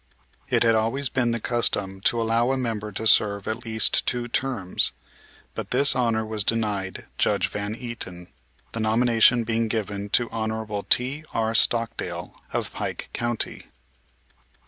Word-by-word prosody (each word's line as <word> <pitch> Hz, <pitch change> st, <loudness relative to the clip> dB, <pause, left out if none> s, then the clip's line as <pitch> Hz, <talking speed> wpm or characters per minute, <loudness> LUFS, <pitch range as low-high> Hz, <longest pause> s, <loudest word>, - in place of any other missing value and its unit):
It -, -, +3 dB
had 115 Hz, -1 st, +4 dB
always 115 Hz, +5 st, +1 dB
been 125 Hz, -2 st, +1 dB
the 115 Hz, 0 st, 0 dB
custom 100 Hz, -5 st, 0 dB
to 120 Hz, -, +3 dB
allow 115 Hz, +2 st, +2 dB
a 135 Hz, -, 0 dB
member 110 Hz, -4 st, -3 dB
to 110 Hz, +3 st, -4 dB
serve 100 Hz, -2 st, +3 dB
at 110 Hz, +2 st, -3 dB
least 110 Hz, -1 st, +2 dB
two 120 Hz, -1 st, -1 dB
terms; 120 Hz, -7 st, -1 dB, 0.6 s
but -, -, -6 dB
this 140 Hz, +3 st, +3 dB
honor 115 Hz, -3 st, +1 dB
was 110 Hz, -1 st, +1 dB
denied 105 Hz, -4 st, -1 dB
Judge -, -, +2 dB
Van 105 Hz, +1 st, -4 dB
Eaton, 90 Hz, -8 st, -6 dB, 0.4 s
the 115 Hz, -, -5 dB
nomination 115 Hz, +1 st, +4 dB
being 115 Hz, 0 st, 0 dB
given 105 Hz, -2 st, -3 dB
to 120 Hz, +3 st, +2 dB
Honorable 110 Hz, -2 st, -3 dB
T.R. 125 Hz, -4 st, +1 dB
Stockdale, 115 Hz, 0 st, 0 dB
of -, -, -3 dB
Pike -, -, -5 dB
county. 120 Hz, -1 st, -2 dB
115 Hz, 145 wpm, -24 LUFS, 105-120 Hz, 0.6 s, had